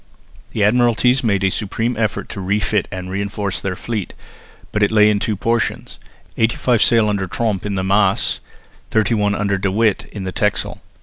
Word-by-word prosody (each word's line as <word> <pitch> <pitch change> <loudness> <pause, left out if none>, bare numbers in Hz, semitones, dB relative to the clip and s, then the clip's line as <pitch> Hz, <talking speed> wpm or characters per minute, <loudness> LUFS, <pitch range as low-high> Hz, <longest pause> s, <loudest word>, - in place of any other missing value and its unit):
The 110 - -2
Admiralties 120 +3 +3
made 100 -4 +1
a 95 - +2
supreme 115 +4 -2
effort 110 -2 -1
to 100 - -6
refit 100 +1 0
and 95 -1 -6
reinforce 100 0 -3
their 95 -1 -2
fleet, 110 -1 -4 0.6
but 105 - -1
it 105 - +4
lay 105 -1 +5
in 105 - +1
two 105 +1 -1
portions; 115 +3 -2 0.4
eighty 115 +1 +2
five 120 -3 +1
sail 115 -2 +4
under 100 -2 -1
Tromp 105 0 -2
in 100 - -2
the 95 - -1
Maas, 100 +3 +2 0.5
thirty 110 0 +2
one 105 -2 +1
under 100 -2 0
De 95 0 0
With 105 0 +1
in 100 - -7
the 95 - -3
Texel. 105 +2 -1
105 Hz, 185 wpm, -19 LUFS, 100-110 Hz, 0.6 s, lay